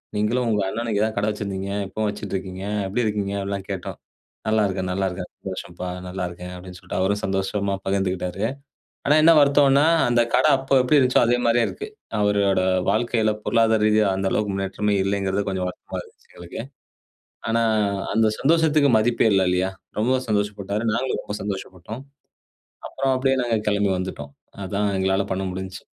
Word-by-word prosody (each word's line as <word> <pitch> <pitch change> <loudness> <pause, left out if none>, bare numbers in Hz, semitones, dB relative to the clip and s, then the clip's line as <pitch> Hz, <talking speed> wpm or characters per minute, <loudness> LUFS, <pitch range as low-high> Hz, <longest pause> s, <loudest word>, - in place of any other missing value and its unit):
நீங்களும் 115 +4 +1
உங்க 105 - +1
அண்ணனும் 115 +3 -3
இங்க 105 -1 +1
தான் 110 - -2
கடை 105 - +1
வச்சிருந்தீங்க. 100 -2 -4 0.2
இப்பவும் 110 +2 -2
வச்சுட்டு 105 -1 -6
இருக்கீங்க. 95 0 -5 0.2
எப்டி 115 +6 -1
இருக்கீங்க? 105 -2 -1
அப்டிலாம் 100 0 -4
கேட்டோம். 95 -3 -5 0.5
"நல்லா 110 0 +3
இருக்கேன், 95 -1 -2
நல்லா 95 +1 0
இருக்கேன். 90 0 -6
சந்தோஷம்ப்பா, 90 -1 -6 0.2
நல்லா 90 0 -4
இருக்கேன்" 90 +1 -9
அப்டின்னு 90 0 -10
சொல்ட்டு 90 - -5
அவரும் 100 +2 +1
சந்தோஷமா 100 +1 -1
பகிர்ந்துக்கிட்டாரு. 95 0 -1 0.6
ஆனா 150 - +5
என்ன 165 - +8
வருத்தம்ன்னா, 140 0 +5 0.2
அந்த 120 0 +4
கடை 155 - +4
அப்ப 135 0 +2
எப்டி 130 +4 +3
இருந்துச்சோ, 130 -2 +4
அதே 120 +1 +3
மாரியே 115 0 +3
இருக்கு. 420 - -7 0.3
அவரோட 100 -2 +2 0.3
வாழ்க்கையில, 110 -1 +1
பொருளாதார 110 -2 +3
ரீதியா 105 -1 +3
அந்த 95 0 0
அளவுக்கு 105 -2 0
முன்னேற்றமே 100 +1 -1
இல்லைங்கிறது, 100 0 0
கொஞ்சம் 95 -1 -2
வருத்தமா - - -7
இருந்துச்சு - - -23
எங்களுக்கு. 85 +4 -8 0.9
ஆனா, 115 0 +2 0.5
அந்த 110 0 +3
சந்தோஷத்துக்கு 155 -1 +3
மதிப்பே 115 +1 +2
இல்ல 95 - +4
இல்லையா? 90 +1 +1 0.3
ரொம்பவும் 130 +3 +1
சந்தோஷப்பட்டாரு. 105 0 -1
நாங்களும் 130 +2 -1
ரொம்ப 105 - -5
சந்தோஷப்பட்டோம். 100 +3 -6 0.8
அப்புறம் 135 -1 0
அப்டியே 135 0 +1
நாங்க 115 -2 +1
கெளம்பி 100 -1 +1
வந்துட்டோம். 75 -6 -6 0.3
அதான் 100 +1 -1
எங்களால 95 +1 +1
பண்ண 95 +1 -2
முடிஞ்ச்சு. 95 0 -6
100 Hz, 160 wpm, -23 LUFS, 95-115 Hz, 0.9 s, என்ன